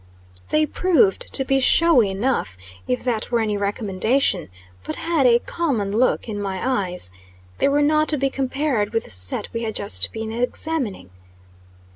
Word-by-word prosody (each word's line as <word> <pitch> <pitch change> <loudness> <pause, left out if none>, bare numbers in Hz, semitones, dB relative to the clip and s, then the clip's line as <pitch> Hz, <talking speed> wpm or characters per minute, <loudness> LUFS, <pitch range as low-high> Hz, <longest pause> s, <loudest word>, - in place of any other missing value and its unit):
They 305 0 +2
proved 370 - +1
to 270 - +3
be 270 0 +2
showy 270 -5 +4
enough, 195 - -2 0.3
if 125 - -1
that 235 -3 -1
were 235 - +1
any 215 -2 0
recommendation, 205 - 0 0.3
but 155 - -4
had 325 -5 +1
a 235 -1 +6
common 240 -8 -2
look 250 +1 +1
in 205 -2 -4
my 200 +2 -1
eyes. 175 - -1 0.5
They - - +3
were 290 +1 +2
not 305 +1 +2
to 300 - +4
be 275 0 0
compared 265 -5 -1
with 225 - 0
the - - -10
set 90 -1 -1
we 230 - -3
had 220 -2 -4
just 90 +1 0
been 220 0 -5
examining. 240 - -3
235 Hz, 165 wpm, -21 LUFS, 200-280 Hz, 0.5 s, a